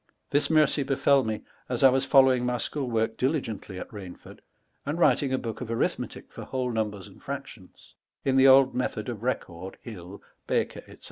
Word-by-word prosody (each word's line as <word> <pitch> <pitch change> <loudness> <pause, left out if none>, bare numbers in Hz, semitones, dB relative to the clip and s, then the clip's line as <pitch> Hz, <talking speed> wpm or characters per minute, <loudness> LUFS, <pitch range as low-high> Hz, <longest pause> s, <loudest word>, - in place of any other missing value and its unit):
This 145 +1 +2
mercie 155 -2 +3
befell 135 0 +3
mo 110 -2 -3 0.3
as 125 -2 -2
T 135 - +9
was 130 +1 +1
following 130 -2 +5
my 125 0 0
sehoole 135 +2 -3
work 110 -1 0
diligently 125 - -2
at - - -6
Rainford, 95 -4 -10 0.4
and 145 +3 -3
writing 145 -5 +3
a 130 - +1
booke 115 -2 -5
of 125 - -4
arithmetick 115 - -3
for - - -8
whole 130 -2 -2
numbers 105 -4 -3
and - - -17
fractions, - - -9 0.3
in 135 - +2
the 135 0 +6
old 135 0 +7
method 115 -3 -2
of 115 -4 -6
Record,' 95 -7 -4
Hill,' 100 -4 -10 0.2
Baker,* - - -1
&c. - - -14
125 Hz, 185 wpm, -27 LUFS, 110-135 Hz, 0.4 s, T